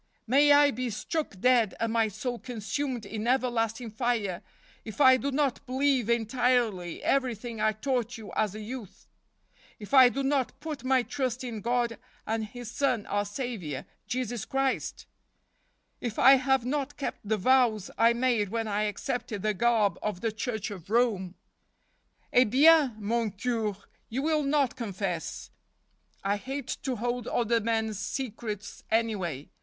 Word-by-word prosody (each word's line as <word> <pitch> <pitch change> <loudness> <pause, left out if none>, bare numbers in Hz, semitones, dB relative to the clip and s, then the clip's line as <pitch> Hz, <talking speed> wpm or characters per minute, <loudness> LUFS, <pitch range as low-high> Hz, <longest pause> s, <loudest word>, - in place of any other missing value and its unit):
May 280 +5 +5
I 290 0 +6
be 255 +1 -3
struck 225 - -3
dead 245 -2 +3
and 230 0 -1
my 225 -1 +3
soul 235 +4 -4
consumed 245 +1 -3
in 220 +1 -4
everlasting 240 -2 0
fire 220 -5 -1 0.4
if 220 +2 -9
I 260 -2 +8
do 275 +2 -2
not 275 -2 0
believe 260 -2 +1
entirely 235 -6 +1
every¬ 260 -4 +1
thing 230 0 -6
I 215 0 +3
taught 240 0 -2
you 220 -2 -9
as 210 -2 0
a 215 - -6
youth; 225 -2 -8 0.7
if 210 +4 -10
I 260 -2 +9
do 275 +3 -3
not 270 -1 0
put 300 -2 -6
my 260 -1 +3
trust 255 -2 -3
in 230 -4 -5
God 235 0 0 0.3
and 220 0 -1
His 240 +1 -8
Son, 255 -5 0
Our 205 0 -1
Saviour, 205 - -5 0.2
Jesus 245 -3 -2
Christ: 270 0 -1 0.9
if 235 -3 -4
I 265 +2 +8
have 265 -1 +1
not 285 +1 -2
kept 275 - -4
the 215 +1 0
vows 230 -2 +3
I 230 +1 +5
made 235 -4 +1
when 225 +1 -2
I 210 0 0
accepted 225 0 -3
the 215 0 +1
garb 210 -3 +2
of 210 -4 -3
the 225 - 0
Church 220 -1 -3
of 190 -3 -9
Rome." 210 -6 +1 0.5
" - - -38
Eh 250 +1 +6
bien, 280 +1 +5
mon 225 +2 0
Cure; 215 -1 -2 0.3
you 260 +4 -2
will 310 0 +2
not 280 -2 +1
confess. 195 -7 -4 0.7
I 200 +1 +1
hate 265 +4 -4
to 260 -2 -2
hold 240 +2 -2
other 235 -1 +1
men's 220 -2 -1
secrets, 215 -2 -5
anyway. 195 - -1
235 Hz, 160 wpm, -28 LUFS, 215-260 Hz, 0.9 s, I